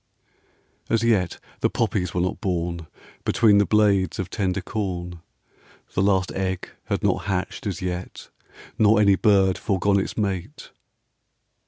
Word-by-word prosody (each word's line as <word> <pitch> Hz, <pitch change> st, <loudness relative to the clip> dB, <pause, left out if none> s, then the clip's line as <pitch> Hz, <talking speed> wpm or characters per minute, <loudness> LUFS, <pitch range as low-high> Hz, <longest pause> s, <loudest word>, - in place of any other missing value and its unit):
As 115 Hz, 0 st, +1 dB
yet 105 Hz, -7 st, +1 dB, 0.2 s
the -, -, +2 dB
poppies 100 Hz, -6 st, -1 dB
were 90 Hz, -, -1 dB
not 90 Hz, -, -2 dB
born 85 Hz, -3 st, -2 dB, 0.4 s
Between 105 Hz, -3 st, +4 dB
the 100 Hz, -, +2 dB
blades 100 Hz, -5 st, +2 dB
of 95 Hz, -1 st, -4 dB
tender 95 Hz, -3 st, -1 dB
corn; 90 Hz, -5 st, -4 dB, 0.7 s
The -, -, +1 dB
last 95 Hz, -2 st, +2 dB
egg 95 Hz, -1 st, -3 dB, 0.2 s
had -, -, -2 dB
not -, -, +1 dB
hatched 95 Hz, +1 st, -3 dB
as 95 Hz, -2 st, -4 dB
yet, 90 Hz, 0 st, -5 dB, 0.5 s
Nor 110 Hz, 0 st, +5 dB
any 100 Hz, -2 st, +5 dB
bird 95 Hz, -3 st, +3 dB
foregone 100 Hz, 0 st, +1 dB
its 95 Hz, -, -4 dB
mate. 100 Hz, -, -3 dB
95 Hz, 140 wpm, -24 LUFS, 90-105 Hz, 0.7 s, Nor